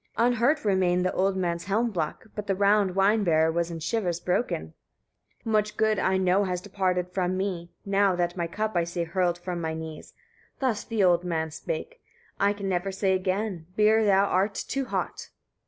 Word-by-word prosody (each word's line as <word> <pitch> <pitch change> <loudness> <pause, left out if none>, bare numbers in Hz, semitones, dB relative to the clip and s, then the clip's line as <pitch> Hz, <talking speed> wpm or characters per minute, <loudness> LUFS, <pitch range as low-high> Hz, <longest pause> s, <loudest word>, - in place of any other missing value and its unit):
Unhurt 245 +4 +2
remained 185 -2 +2
the 185 - 0
old 190 +1 +1
man's 170 -2 -2
helm 225 +5 +1
block, 165 -2 -3
but 210 -1 -6
the 195 - +1
round 200 -1 +3
wine 205 +3 +3
bearer 160 -2 +3
was 170 +1 -1
in 165 -1 -5
shivers 175 0 -1
broken. 180 - -1 0.7
32. - - -5
"Much 210 -1 +1
good, 220 -2 +2
I 190 0 +2
know, 190 +1 +3
has 180 -1 -2
departed 180 -2 -1
from 185 0 -1
me, 185 -3 -3 0.2
now 195 -1 +2
that 175 0 -1
my 170 -2 -2
cup 215 +4 -3
I 170 - +3
see 170 0 -3
hurled 175 0 0
from 175 -1 -5
my 160 -1 -2
knees." 160 -1 -8 0.4
Thus 245 -6 -1
the 225 -4 0
old 175 -1 +4
man 160 -3 -2
spake: - - -5 0.4
"I 200 +1 +3
can 200 -1 -4
never 190 +1 -1
say 190 0 +1
again, 185 -2 -2
beer 215 +1 +4
thou 200 -1 +4
art 195 +1 +1
too 270 0 -2
hot. - - -4
190 Hz, 190 wpm, -27 LUFS, 175-205 Hz, 0.7 s, old